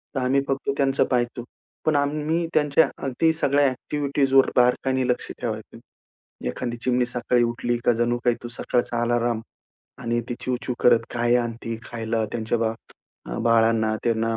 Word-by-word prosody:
तर -, -, +1 dB
आम्ही 130 Hz, +2 st, +2 dB
फक्त 135 Hz, 0 st, -2 dB
त्यांचं 135 Hz, -1 st, +2 dB
पहायचो. 120 Hz, -1 st, -1 dB, 0.4 s
पण 155 Hz, -, +2 dB
आम्ही 150 Hz, +4 st, 0 dB
त्यांच्या 150 Hz, +1 st, +4 dB, 0.2 s
अगदी 140 Hz, +5 st, +2 dB
सगळ्या 145 Hz, -2 st, +2 dB
अ‍ॅक्टिव्हिटीजवर 135 Hz, 0 st, +2 dB
बारकाईने 125 Hz, +1 st, +2 dB
लक्ष 125 Hz, -1 st, -1 dB
ठेवायचं. 110 Hz, -2 st, -5 dB, 0.7 s
एखादी 120 Hz, -, -3 dB
चिमणी 125 Hz, -1 st, +2 dB
सकाळी 125 Hz, 0 st, +1 dB
उठली 120 Hz, +1 st, 0 dB
का 120 Hz, -, +5 dB
जणू 120 Hz, 0 st, +2 dB
काही 120 Hz, -1 st, +3 dB
तो 120 Hz, -, -6 dB
सकाळचा 120 Hz, 0 st, -1 dB
आलाराम 120 Hz, -1 st, +1 dB, 0.6 s
आणि 120 Hz, -1 st, -1 dB
ती 120 Hz, -, -2 dB
चिव-चिव 125 Hz, 0 st, -2 dB
करत 115 Hz, -1 st, +4 dB
काय 120 Hz, 0 st, +2 dB
आणती 115 Hz, -1 st, -3 dB
खायला 115 Hz, -1 st, -2 dB
त्यांच्या 115 Hz, 0 st, -1 dB
बा 115 Hz, -1 st, +1 dB, 0.6 s
अ, -, -, -4 dB
बाळांना. 115 Hz, -1 st, +3 dB
त्यांना 115 Hz, -1 st, 0 dB
120 Hz, 150 wpm, -24 LUFS, 115-135 Hz, 0.7 s, का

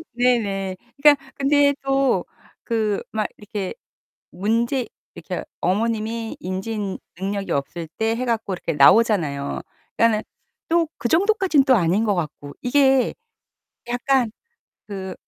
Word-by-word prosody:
네네. 205 Hz, -6 st, +1 dB, 0.3 s
그러니까 280 Hz, -2 st, +5 dB
근데 285 Hz, +1 st, +3 dB
또 270 Hz, 0 st, +2 dB, 0.4 s
그 220 Hz, -3 st, 0 dB
막 215 Hz, -1 st, -1 dB
이렇게 210 Hz, -2 st, -5 dB, 0.6 s
문제 230 Hz, +7 st, 0 dB, 0.3 s
이렇게 -, -, -5 dB, 0.2 s
어머님이 225 Hz, +3 st, -1 dB
인지 195 Hz, +2 st, -3 dB, 0.2 s
능력이 195 Hz, +1 st, -3 dB
없을 160 Hz, +4 st, -2 dB
때 225 Hz, +1 st, +1 dB
해 255 Hz, +2 st, -2 dB
갖고 225 Hz, -4 st, -1 dB
이렇게 170 Hz, -2 st, -3 dB
나오잖아요. 150 Hz, -3 st, +3 dB, 0.4 s
그러니까는 225 Hz, -2 st, +3 dB, 0.5 s
또 335 Hz, -1 st, +3 dB
그 235 Hz, -, -1 dB
정도까진 380 Hz, -5 st, +3 dB
또 260 Hz, -, +5 dB
아닌 190 Hz, +3 st, +2 dB
것 205 Hz, -, +2 dB
같고. 150 Hz, -3 st, -5 dB
이게 265 Hz, -1 st, +3 dB, 0.8 s
약간 245 Hz, -1 st, +1 dB, 0.6 s
그 190 Hz, -2 st, -5 dB
225 Hz, 250 characters per minute, -22 LUFS, 195-260 Hz, 0.8 s, 그러니까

